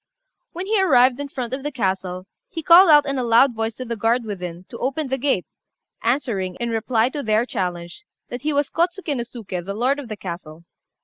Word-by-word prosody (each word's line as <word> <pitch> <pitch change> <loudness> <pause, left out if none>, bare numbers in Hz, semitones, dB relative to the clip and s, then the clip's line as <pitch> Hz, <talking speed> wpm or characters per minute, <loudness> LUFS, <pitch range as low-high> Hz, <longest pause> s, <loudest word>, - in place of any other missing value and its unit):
When 360 +3 -5
he 420 0 +2
arrived 255 -7 +4
in 285 - -4
front 255 -3 -5
of 265 - -3
the 295 +2 -4
castle, 190 -6 -2 0.2
he 330 -7 -6
called 345 +3 +8
out 295 -1 +7
in 275 -2 -2
a - - -1
loud 235 +3 +4
voice 225 0 -3
to 255 - -6
the 235 -1 -3
guard 230 +3 +1
within 180 -5 -6
to 235 - -9
open 275 +3 -2
the 265 - 0
gate, 260 -9 0 0.6
answering, 225 -7 -1
in 235 -1 -3
reply 225 +1 +1
to 290 +1 -4
their 220 -1 +1
challenge, 180 - -4 0.3
that 245 0 -6
he 305 +2 -1
was 285 -1 0
Kôtsuké 345 -2 -1
no 245 - -2
Suké, 215 -7 -6
the 200 +3 -5
lord 260 +6 +1
of 280 - -7
the 215 -2 -6
castle. 170 -4 -8
240 Hz, 215 wpm, -22 LUFS, 205-285 Hz, 0.6 s, called